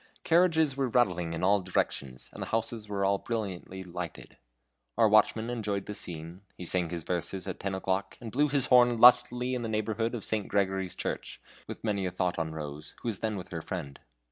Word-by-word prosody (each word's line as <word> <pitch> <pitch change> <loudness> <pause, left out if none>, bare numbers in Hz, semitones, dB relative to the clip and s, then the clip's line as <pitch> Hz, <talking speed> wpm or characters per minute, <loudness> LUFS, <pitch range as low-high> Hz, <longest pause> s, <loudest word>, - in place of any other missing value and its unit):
Carriages 160 -4 +4
were 135 -1 0
rattling 90 -9 +2
in 80 - -4
all 100 +2 +4
directions, 70 -8 -2
the - - -5
houses 110 -1 -2
were 100 -1 0
all 100 0 +2
brilliantly 95 -4 -4
lighted. 90 -3 -7 0.6
Our 115 -1 +6
watchman 110 +2 +3
enjoyed 105 -5 -2
the 105 - -5
scene, 85 -1 -7 0.2
he 90 - -6
sang 90 -1 0
his 85 -1 -4
verses 90 +3 -3
at 95 - -5
ten 95 -1 -2
o'clock, 95 +1 -2
and 115 -3 -7
blew 145 +5 +3
his 140 -2 +2
horn 120 -2 +5
lustily 125 +1 +6
in 125 - -1
the 115 - -3
neighborhood 110 +2 -1
of 110 - -6
St. 105 -3 -1
Gregory's 95 -2 0
Church, - - -4 0.3
with - - -8
many 100 -4 0
a - - -3
thought 90 -1 -1
on 80 -1 -2
Rose, 75 -1 -7
who 120 - 0
was 100 -5 -2
then 110 -2 -1
with 90 - -7
her 80 -2 -4
friend. 80 -7 -6
100 Hz, 200 wpm, -29 LUFS, 90-115 Hz, 0.6 s, Our